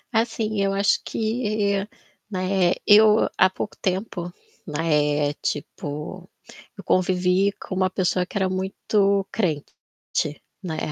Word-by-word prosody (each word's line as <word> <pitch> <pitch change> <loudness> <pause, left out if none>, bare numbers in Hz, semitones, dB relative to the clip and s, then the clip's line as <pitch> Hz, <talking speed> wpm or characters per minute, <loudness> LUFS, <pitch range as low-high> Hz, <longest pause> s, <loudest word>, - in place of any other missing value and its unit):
Assim, 220 -2 0
eu 195 0 +1
acho 200 +1 +2
que, 215 -3 -1 0.4
né, 185 -2 +1
eu 215 +1 +6
há 185 - +5
pouco 200 +2 -5
tempo, 185 -2 -2 0.4
né, 150 -2 +1
tipo, 150 +4 -5 0.5
eu 200 - -9
convivi 185 +1 +2
com 190 - -8
uma 185 0 +1
pessoa 180 -1 0
que 195 - -6
era 190 - +2
muito 195 +1 0
crente, 160 -9 -1 0.9
né. 175 -5 -4
190 Hz, 115 wpm, -23 LUFS, 180-205 Hz, 0.9 s, eu